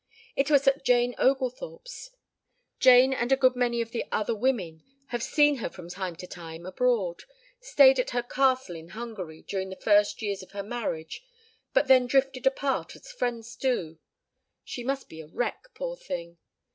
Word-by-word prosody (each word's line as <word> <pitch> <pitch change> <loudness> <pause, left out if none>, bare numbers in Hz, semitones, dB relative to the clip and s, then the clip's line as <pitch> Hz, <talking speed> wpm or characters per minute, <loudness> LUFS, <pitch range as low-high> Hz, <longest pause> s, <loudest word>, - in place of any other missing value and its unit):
It 275 +1 +1
was 280 -2 +4
at 270 0 +3
Jane 245 -1 +3
Oglethorpe's. 275 - -2 0.7
Jane 255 +1 +7
and 240 0 -1
a - - +7
good 255 -1 +4
many 240 -1 +1
of 230 0 -5
the 235 - -2
other 215 +2 0
women 205 -9 -1 0.3
have 240 -1 -3
seen 295 +2 +3
her 230 - -3
from 175 -2 -11
time 180 -1 -5
to 180 - -9
time 165 -1 -9
abroad 195 -3 0 0.3
stayed 275 - +5
at 250 - 0
her 245 -1 -1
castle 260 -6 +1
in 165 0 -10
Hungary 195 -9 -7
during 190 -1 -4
the 190 - -7
first 205 +2 +2
years 200 -2 -2
of 185 - -15
her 200 0 -4
marriage; 205 - -5 0.5
but - - +3
they 260 -1 +8
drifted 265 +1 +1
apart 270 0 -1
as - - -13
friends 240 - -3
do.... 175 -13 -2 0.6
She 245 - -6
must 270 +2 -2
be 160 0 -10
a 155 - -13
wreck, 245 - -3
poor - - -4
thing. 170 - -7
240 Hz, 175 wpm, -27 LUFS, 190-265 Hz, 0.7 s, they